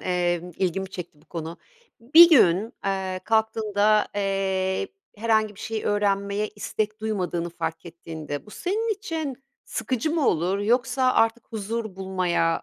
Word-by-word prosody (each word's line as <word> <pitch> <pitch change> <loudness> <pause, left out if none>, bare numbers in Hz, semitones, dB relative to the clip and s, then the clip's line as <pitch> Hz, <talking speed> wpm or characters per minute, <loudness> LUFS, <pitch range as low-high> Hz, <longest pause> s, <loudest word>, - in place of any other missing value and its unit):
eee, 175 -1 0
ilgimi 190 +1 -1
çekti 170 -5 -8
bu - - -24
konu. 165 0 -6 0.4
Bir 315 +9 +9
gün, 215 - +5
eee, 190 -1 -2
kalktığında, 215 -1 +2
eee, 195 - 0 0.3
herhangi 215 -1 +1
bir - - -13
şey 225 -1 -4
öğrenmeye 205 0 0
istek 215 0 -3
duymadığını 180 -5 -2
fark 165 0 -5
ettiğinde 160 -2 -7
bu - - -13
senin 430 - -1
için 320 - -5 0.2
sıkıcı 260 +4 -2
mı 320 -4 +1
olur 180 +5 +1
yoksa 250 +4 +2
artık 225 +1 +2
huzur 220 -1 -4
bulmaya 180 -3 0
205 Hz, 135 wpm, -25 LUFS, 180-225 Hz, 0.4 s, Bir